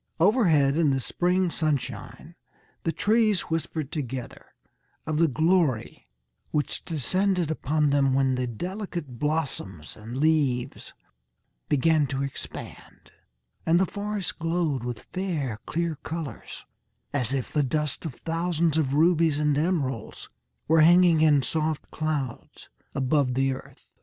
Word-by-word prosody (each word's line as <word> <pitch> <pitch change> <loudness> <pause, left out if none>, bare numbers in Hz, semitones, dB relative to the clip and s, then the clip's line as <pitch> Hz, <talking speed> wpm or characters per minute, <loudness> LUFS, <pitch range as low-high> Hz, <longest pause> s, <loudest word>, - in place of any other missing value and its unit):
Overhead, 160 - +4
in 165 -3 +3
the 135 -1 +1
spring 180 +6 +1
sunshine, 155 -5 -3 0.5
the 165 - +2
trees 215 -1 +2
whispered 160 -2 -2
together 130 -4 -5 0.6
of 155 -1 -1
the 165 - +5
glory 155 -5 +1 0.4
which 150 -2 -2
descended 180 +2 0
upon 150 -1 +1
them 135 -2 +3
when 135 -1 +2
the 125 0 -1
delicate 170 - -5
blossoms 140 - -2
and 115 +3 -8
leaves 145 -5 0 0.7
began 150 +1 +3
to 135 +1 -2
expand, 140 - -8 0.5
and 170 +1 +3
the 190 - +3
forest 205 -1 -4
glowed 165 -6 0
with 120 -2 -5
fair, 155 - -2
clear 170 0 -1
colours, 160 0 -7 0.5
as 130 -4 0
if 135 -3 -2
the 150 - +3
dust 150 +1 -1
of 155 -7 -5
thousands 165 -1 0
of 140 -3 0
rubies 160 -1 +4
and 150 -1 +2
emeralds 145 - -2 0.4
were 160 0 +5
hanging, 170 0 +6
in 150 -3 +5
soft 155 0 -2
clouds, 150 -6 -4 0.3
above 135 -1 +1
the 135 0 +2
earth. 130 - -11
155 Hz, 125 wpm, -26 LUFS, 135-170 Hz, 0.7 s, hanging